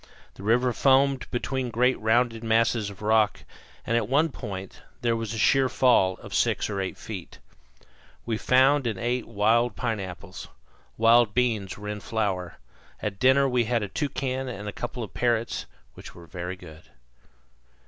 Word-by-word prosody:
The - - -13
river 120 +4 +2
foamed 135 0 +3
between 130 +1 -2
great 125 +3 +2
rounded 115 +1 +1
masses 115 -1 +2
of 100 +1 -11
rock, 110 -1 +2 0.4
and 115 - 0
at 115 -2 0
one 150 +5 +3
point 95 -8 -7 0.2
there 115 -1 +1
was 115 -1 -4
a 115 - -4
sheer 130 +4 +3
fall 115 -8 +3
of - - -9
six - - +1
or 100 -1 -2
eight 95 - -4
feet. 95 -6 -8 0.9
We 110 -2 -2
found 135 +1 +4
and 110 -4 -2
ate 120 +3 -2
wild 115 +2 +2
pineapples. 100 -5 -5 0.5
Wild 115 -1 +4
beans 115 -6 0
were 105 0 -8
in 105 0 -4
flower. 100 -5 -2 0.4
At 100 -2 -4
dinner 130 +3 +5
we 125 -2 +1
had 115 -1 0
a - - -3
toucan 135 +1 -3
and 105 -3 -6
a 105 - -4
couple 120 - -5
of 105 - -9
parrots, 115 - -1 0.3
which - - -12
were 85 - -12
very 90 +1 -6
good. 80 -4 -13
115 Hz, 165 wpm, -26 LUFS, 105-125 Hz, 0.9 s, dinner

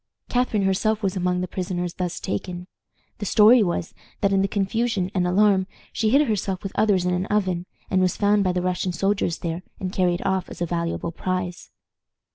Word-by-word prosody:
Catharine 245 -5 +1
herself 215 +3 +1
was 195 0 0
among 180 -1 0
the 180 - -2
prisoners 180 -1 -3
thus 180 -1 -3
taken. 175 - -4 0.5
The 205 - -3
story 220 +5 +7
was, 175 -3 -1 0.3
that 200 -1 +2
in 195 - +3
the 195 - +2
confusion 200 -1 -1
and 180 -2 +1
alarm 190 0 +3 0.3
she 220 - +1
hid 280 +5 +4
herself 195 -3 -1
with 195 - -4
others 200 -4 +2
in 180 - +1
an 180 +2 -1
oven, 185 -4 0 0.2
and 185 - +3
was 185 -1 +1
found 205 0 +3
by 185 - +2
the 180 0 -1
Russian 180 0 -1
soldiers 195 -1 0
there, 170 +1 -4 0.2
and 185 0 -4
carried 175 -2 +1
off 190 -2 -1
as - - -9
a 175 - 0
valuable 170 0 -2
prize. 180 0 -3
185 Hz, 195 wpm, -24 LUFS, 180-205 Hz, 0.5 s, story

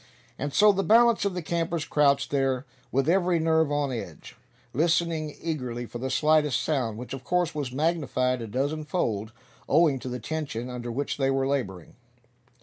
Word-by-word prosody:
And 145 +2 -2
so 210 +7 +6
the 195 -1 0
balance 230 +3 +4
of 195 -2 -1
the 180 - -3
campers 165 -1 -1
crouched 145 -3 +2
there, 135 -2 0 0.3
with 135 +1 +1
every 180 0 +3
nerve 160 -2 +2
on 145 -2 0
edge, 120 - -7 0.4
listening 160 0 0
eagerly 125 -7 -3
for 120 - -8
the 130 +2 -3
slightest 150 0 +2
sound, 125 -8 -1
which 125 +3 -7
of 135 -1 -7
course 180 +4 0
was 145 -4 -3
magnified 130 -4 0
a 115 - -5
dozen 145 +7 -2
fold, 110 - -2 0.4
owing 150 -3 +4
to 130 - -6
the 125 - -3
tension 125 -3 -4
under 120 -1 -5
which 140 +4 -3
they 135 -2 +1
were 135 0 +1
laboring. 110 - -3
145 Hz, 175 wpm, -26 LUFS, 125-165 Hz, 0.4 s, so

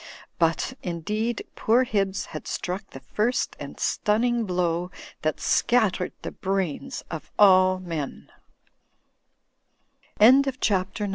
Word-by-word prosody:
But, 165 +8 +1
indeed, 210 +7 -3
poor 235 +4 +3
Hibbs 195 -5 -1
had - - -7
struck 190 +3 -4
the 135 - -11
first 215 - -1
and - - -8
stunning 230 +2 +1
blow 175 -1 0 0.3
that 155 0 -1
scattered 215 -7 +1
the - - -4
brains 195 - -3
of 160 -2 -6
all 185 -2 +6
men. 165 -6 -6
190 Hz, 95 wpm, -25 LUFS, 175-220 Hz, 0.3 s, all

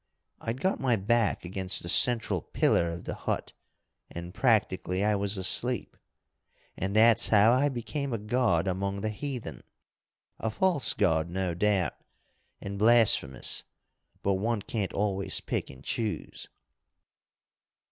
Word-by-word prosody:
I'd 115 +3 -4
got 190 - 0
my 130 -3 +2
back 110 -1 0
against 95 0 -2
the - - -6
central 115 - +3
pillar 85 - +1
of 85 - -7
the - - -5
hut, - - -4 0.6
and, 85 +1 -8
practically, 100 -5 +1
I 105 - +2
was 100 0 -1
asleep. 120 +6 +1 0.8
And 95 +3 -3
that's 115 +1 +5
how 105 +1 +5
I 135 +4 +3
became 140 +2 -4
a 115 - -1
god 105 -5 0
among 100 +2 -2
the 110 +1 -2
heathen 115 - -6 0.8
a 110 - -2
false 170 - +2
god 80 -5 +1
no 90 0 -2
doubt, 95 -4 +1 0.7
and 100 0 -6
blasphemous, 110 - +3 0.6
but 100 - +2
one 110 -2 -1
can't 105 -4 -3
always 100 -1 -1
pick - - -4
and 65 0 -13
choose. 110 - -4
105 Hz, 135 wpm, -28 LUFS, 95-115 Hz, 0.8 s, that's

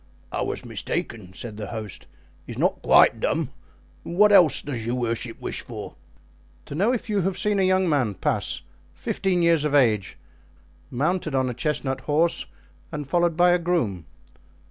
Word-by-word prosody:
"I - - -2
was - - -3
mistaken," 100 -6 -4
said 110 +1 -7
the 105 -2 -5
host, 110 -3 -7 0.4
"he's - - -7
not - - +1
quite - - +5
dumb. 160 -5 -1 0.5
And 170 - -6
what 210 +1 +6
else 175 -7 +6
does 130 -6 -4
your 120 +2 -1
worship 115 -1 -3
wish - - -4
for?" - - -8 0.7
"To - - -8
know 195 +10 +2
if 250 - -2
you 205 -3 +1
have 190 +1 -1
seen 210 -1 +1
a 190 - +3
young 185 0 +3
man 130 - +1
pass, - - -1 0.3
fifteen 180 -3 0
years 165 -3 +4
of 150 -1 +1
age, 110 -8 +2 0.7
mounted 155 +3 -1
on 130 -1 +1
a - - -5
chestnut 135 -1 -2
horse 155 +5 +1 0.4
and 150 -2 -4
followed 170 0 +1
by 175 0 +5
a 175 - +3
groom?" 155 - -1
150 Hz, 170 wpm, -24 LUFS, 120-175 Hz, 0.7 s, what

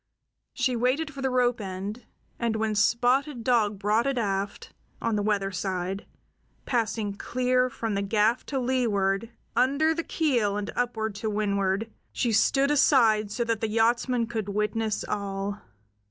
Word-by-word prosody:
She 255 -2 +1
waited 265 +6 0
for 275 - -7
the 265 - +1
rope 245 -2 +1
end, 195 +4 -5 0.3
and 235 -2 0
when 220 0 0
Spotted 245 +5 +2
Dog 220 -4 +2
brought 215 +5 +1
it 275 -2 0
aft, 200 -3 -2 0.3
on 230 - 0
the 205 - +1
weather 200 -2 0
side, 185 +1 -3 0.6
passing 220 -4 -1
clear 255 +4 +1
from 225 -3 -3
the 200 - 0
gaff 215 +4 +2
to 275 - -2
leeward, 230 -5 0 0.3
under 280 +6 +3
the 335 - -2
keel 240 -13 +1
and 205 -1 -3
up 245 -2 -1 0.2
to 205 +2 -3
windward, 200 0 0 0.2
she 240 - 0
stood 270 +6 +3
aside 225 -7 +4
so 235 +4 -1
that 230 -2 -1
the 225 - 0
yachtsmen 235 +2 +2
could 225 -3 -4
witness 210 +1 -1
all. 200 0 -3
225 Hz, 155 wpm, -27 LUFS, 205-250 Hz, 0.6 s, aside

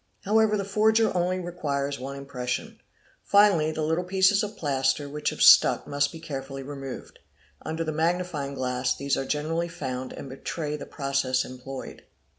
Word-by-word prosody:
However 215 +1 +3
the 200 - -2
forger 220 +2 +3
only 180 +1 +1
requires 145 -6 -3
one 135 +2 -6
impression. 130 -3 -4 0.4
Finally 200 -7 +4
the 155 - -2
little 160 +3 0
pieces 190 +2 +3
of 210 0 -5
plaster 140 0 0
which 150 +1 -2
have - - -1
stuck - - +7
must 145 0 0
be 165 - -9
carefully 135 -3 -6
removed. 135 -1 -8 0.4
Under 160 +1 -3
the 160 - -2
magnifying 160 -3 -1
glass 125 -1 -1
these 140 0 0
are 135 - -2
generally 160 +4 -1
found 130 -6 -5
and - - -8
betray 145 +3 -4
the 150 - -8
process 135 -2 0
employed. 130 +1 -8
150 Hz, 160 wpm, -26 LUFS, 135-175 Hz, 0.4 s, stuck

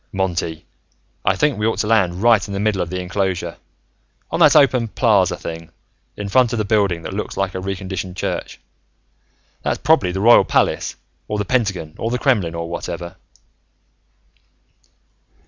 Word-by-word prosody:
"Monty, 90 -4 -2 0.6
I - - +2
think 145 -7 +1
we 105 - +1
ought 115 - 0
to - - -2
land 100 -4 +1
right 115 -4 +4
in 100 - -5
the - - -2
middle 105 -2 0
of 85 - -3
the 90 +1 -3
enclosure, 90 -1 -2 0.7
on - - -1
that - - +6
open 130 -5 +4
plaza 100 -6 +2
thing, 85 0 -7 0.5
in 105 - -4
front 120 +3 +3
of - - -1
the 110 - -1
building 100 -6 +1
that - - -6
looks 105 - -5
like 95 -1 -1
a 95 - -4
reconditioned 95 -1 -5
church. - - -4 1.0
That's - - -1
probably 140 - +2
the 95 - -3
Royal 115 +4 +7
Palace, - - 0 0.3
or 105 - -2
the 105 - -2
Pentagon, 100 -9 -1
or 115 - -1
the 125 - -1
Kremlin, 105 - +1
or 85 0 -4
whatever." 85 +1 -6
95 Hz, 165 wpm, -20 LUFS, 90-110 Hz, 1.0 s, Royal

